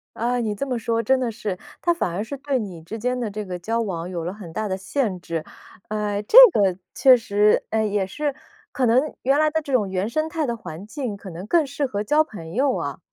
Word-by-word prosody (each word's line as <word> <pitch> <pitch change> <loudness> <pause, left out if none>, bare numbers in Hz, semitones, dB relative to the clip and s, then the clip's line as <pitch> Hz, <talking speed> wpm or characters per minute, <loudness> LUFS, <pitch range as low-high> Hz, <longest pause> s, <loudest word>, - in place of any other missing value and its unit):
啊， 245 +2 0
你 215 -3 -1
这 275 - -3
么 250 -3 -2
说 230 0 0
真 265 +4 +3
的 240 -3 -1
是， 210 -4 -4 0.2
它 345 - +3
反 195 - -2
而 195 +5 -2
是 280 +5 -6
对 275 -1 -1
你 185 -6 -6
之 210 +8 -7
间 250 +3 -1
的 230 -3 -2
这 210 0 -5
个 180 -1 -5
交 225 +6 -1
往 180 -4 -4
有 170 -3 -4
了 180 +3 -3
很 190 -6 -10
大 215 +4 -2
的 190 - -1
限 195 -1 -2
制。 165 -3 -4 0.5
呃， 210 -1 -1
这 450 - +4 0.2
个， 190 -4 +2 0.2
确 260 -2 +7
实， 210 -2 +2
呃， 220 0 +1
也 205 -2 0
是， 290 +6 -2 0.4
可 260 -3 0
能 255 +6 +2
原 270 +3 +2
来 310 0 +4
的 320 0 0
这 285 - -7
种 215 -6 +2
原 190 +3 -1
生 310 +5 -1
态 320 -2 -2
的 235 -2 -2
环 175 -2 -8
境， 245 -4 -4
可 195 -1 -10
能 175 +3 -8
更 315 +6 +3
适 280 +1 -2
合 205 -5 -2
交 300 +8 +3
朋 165 - -10
友 270 +3 +2
啊。 - - -4
220 Hz, 265 characters per minute, -23 LUFS, 195-265 Hz, 0.5 s, 确